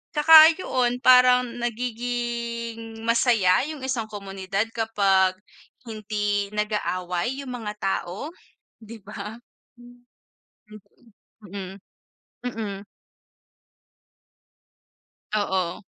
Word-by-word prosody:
Tsaka 315 +1 +9
'yon 250 -7 -1
parang 250 0 +6 0.2
nagiging 235 -1 -4
masaya 230 -1 +3
'yung 305 -4 -7
isang 255 -4 -2
komunidad 195 -1 -3
kapag 195 -5 +2 0.5
hindi 210 -2 -2
nag-aaway 210 0 -2
'yung 260 - -7
mga 225 -4 -5
tao, 195 - -3 0.5
'di 225 +1 -11
ba? 210 +1 -8 0.4
Hmm, 245 0 -17 2.4
mm, 250 -1 -4
mm. 200 -3 -5 2.5
Oo. 190 -4 -1
225 Hz, 75 wpm, -24 LUFS, 200-245 Hz, 2.5 s, Tsaka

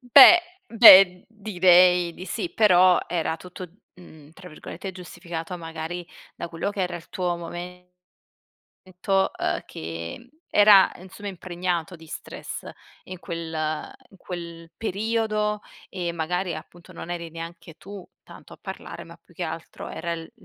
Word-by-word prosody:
Beh, 275 +7 +9 0.3
beh, 195 -5 +8
direi 180 -4 +4
di 185 - -9
sì, 350 - -4
però 185 -4 +5
era 165 -2 -2
tutto, 180 +1 -10 0.3
mhmm, 155 -4 -16
tra 180 +2 -13
virgolette 190 +4 -8
"giustificato" 175 -1 -7
magari 165 +1 -6 0.3
da - - -6
quello 170 +5 -3
che 200 -2 -3
era 180 -1 -3
il 165 - -13
tuo 175 -2 -2
momento, 180 +1 -9 1.5
uhm, - - -1
che 85 - -8 0.2
era 205 -2 +7
insomma 190 +3 -10
impregnato 180 -1 -4
di 160 0 -15
stress - - -8 0.4
in 185 -1 -9
quel 165 -1 -6 0.6
in 195 - -19
quel 170 -2 -8
periodo 215 0 -1 0.3
e 175 -3 -3
magari 175 +1 -2
appunto 175 +3 -12
non 170 - -9
eri 170 -1 -5
neanche 165 0 -9
tu 195 -1 -11 0.2
tanto - - -14
a - - -15
parlare, - - -8
ma - - -14
più - - -25
che - - -5
altro - - -7
era 170 -1 -4
il 165 -1 -8
180 Hz, 140 wpm, -24 LUFS, 170-190 Hz, 1.5 s, Beh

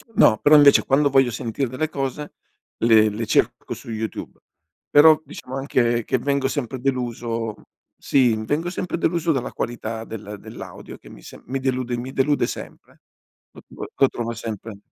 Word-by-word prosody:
no, 110 - +6
però 150 +1 +6
invece 145 -1 +7
quando 140 +2 +3
voglio 135 -2 +4
sentire 120 +2 -3
delle 150 +5 -2
cose 140 +1 -4 0.4
le 110 -2 +5
le 110 +2 -4
cerco - - 0
su - - -10
YouTube, 110 0 -5 0.5
però 155 +1 +7
diciamo 130 -3 -8
anche 120 -4 +1
che - - +1
vengo 140 +2 0
sempre 135 -2 -3
deluso 120 -3 -2 0.5
sì, 125 -5 +3
vengo 160 +7 -1
sempre 180 -2 -3
deluso 170 0 0
dalla 135 -5 -2
qualità 115 -1 -4
del 105 -2 -8
dell'audio - - -10
che - - -16
mi - - -13
se - - -12
mi 135 +2 -3
delude 130 -2 -1
mi 125 +2 -6
delude 145 +2 +1
sempre, - - -9 0.5
lo - - -15
tro - - -8
lo 135 - +3
trova 115 -1 -4
sempre 110 -2 -7
130 Hz, 165 wpm, -22 LUFS, 115-140 Hz, 0.5 s, invece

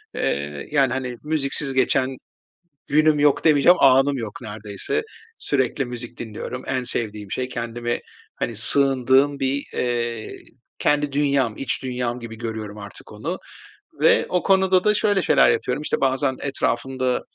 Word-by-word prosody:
Eee, 70 0 -2
yani, 135 -4 +3
hani, 125 -2 -4
müziksiz 150 -2 0
geçen 130 0 +2 0.8
günüm 155 +1 +4
yok 145 -1 +3
demeyeceğim, 160 +3 +5
anım 135 +1 +5
yok 110 -3 -6
neredeyse. 105 - -3 0.4
Sürekli 135 0 0
müzik 120 -1 -6
dinliyorum. 120 +3 -6
En 130 -1 -1
sevdiğim 105 -4 -3
şey. 125 0 -2
Kendimi, 120 -1 -3 0.4
hani, 115 - -3
sığındığım 135 +3 +3
bir, 135 +1 -1
eee, 120 -2 -2 0.4
kendi 145 -1 +1
dünyam, 140 -6 +1
iç 135 -3 -1
dünyam 125 -1 -3
gibi 115 -1 -9
görüyorum 110 -2 -5
artık 100 -2 -11
onu - - -4 0.6
ve - - +5
o 180 - 0
konuda 190 -1 +3
da 210 0 +3
şöyle 205 -2 +2
şeyler - - +4
yapıyorum. 125 +4 -1
İşte, - - -2
bazen 135 0 +1
etrafımda 130 -1 -1
130 Hz, 140 wpm, -22 LUFS, 120-140 Hz, 0.8 s, demeyeceğim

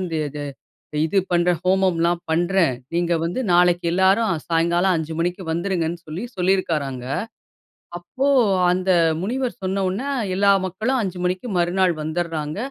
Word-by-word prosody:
அந்தது 155 -5 -3 0.6
இது 195 +5 +1
பண்ணுறேன். 175 -1 +2
ஹோமம்லாம் 180 -2 +2
பண்ணுறேன். 170 -3 +2 0.2
நீங்க 170 0 +1
வந்து 170 +9 -2
நாளைக்கு 175 0 +3
எல்லாரும் 190 +5 +3 0.2
சாயங்காலம் 170 +3 +2
5 160 0 -4
மணிக்கு 175 +3 -1
வந்துருங்கன்னு 170 -1 -1
சொல்லி 155 +7 -6
சொல்லியிருக்காராங்க. 165 -9 0 0.9
அப்போ 260 +10 -3 0.4
அந்த 185 +1 +1 0.3
முனிவர் 250 +5 -2
சொன்னவுன்ன 190 +3 -1 0.3
எல்லா 200 +1 +4
மக்களும் 220 +8 -1
5 190 -3 -4
மணிக்கு 180 +6 -2
மறுநாள் 175 +1 +2
வந்துர்றாங்க. 155 -1 -3
175 Hz, 120 wpm, -22 LUFS, 165-190 Hz, 0.9 s, எல்லா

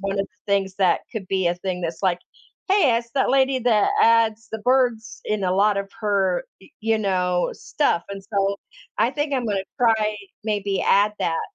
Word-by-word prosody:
1 195 0 -2
of 195 - -3
the 185 +2 -7
things 195 -1 0
that 190 -3 +2
could 215 -5 -5
be 190 -2 0
a 175 - 0
thing 180 0 -4
that's, 165 -1 -4
like, 180 -2 +1 0.5
"Hey 370 - +4
it's 235 0 -4
that 270 - +2
lady 265 0 +3
that 225 -4 +3
adds 225 -1 +3
the 220 - -3
birds 225 -3 0
in 215 -2 -2
a 180 - +1
lot 205 +1 +3
of 200 0 -5
her, 195 -4 +1 0.2
y 190 - -17
you 225 0 +1
know, 180 -3 0
stuff," 225 - -1
and 195 0 -7
so, 200 -1 0 0.4
I - - +3
think 295 0 -2
I'm 250 -3 -1
going 205 -2 0
to 190 - -4 0.2
try 220 -3 +2 0.3
maybe 205 -2 -1
add 205 +1 +3
that 165 -1 0
205 Hz, 205 wpm, -23 LUFS, 190-230 Hz, 0.5 s, Hey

